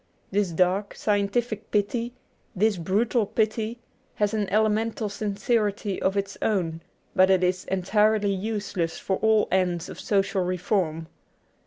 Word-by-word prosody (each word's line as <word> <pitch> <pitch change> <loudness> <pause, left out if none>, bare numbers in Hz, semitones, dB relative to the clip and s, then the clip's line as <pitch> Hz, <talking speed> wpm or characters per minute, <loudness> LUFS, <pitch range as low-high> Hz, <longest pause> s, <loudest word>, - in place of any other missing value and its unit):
This 200 -1 +1
dark, 185 +4 +1
scientific 210 +2 -1
pity, 230 +3 0 0.4
this 205 +1 +2
brutal 210 +6 +1
pity, 220 +2 -1 0.4
has 210 0 +1
an 210 -3 -1
elemental 215 +1 +1
sincerity 205 0 -1
of 190 +1 +1
its 200 0 -3
own, 170 -6 0 0.3
but 185 0 +5
it 190 -1 +4
is 180 0 0
entirely 205 +2 +2
useless 200 -4 -2
for 190 - -1
all 220 -1 +3
ends 180 -2 +1
of - - -9
social 195 -1 +1
reform. 180 -3 -1
200 Hz, 130 wpm, -25 LUFS, 185-215 Hz, 0.4 s, but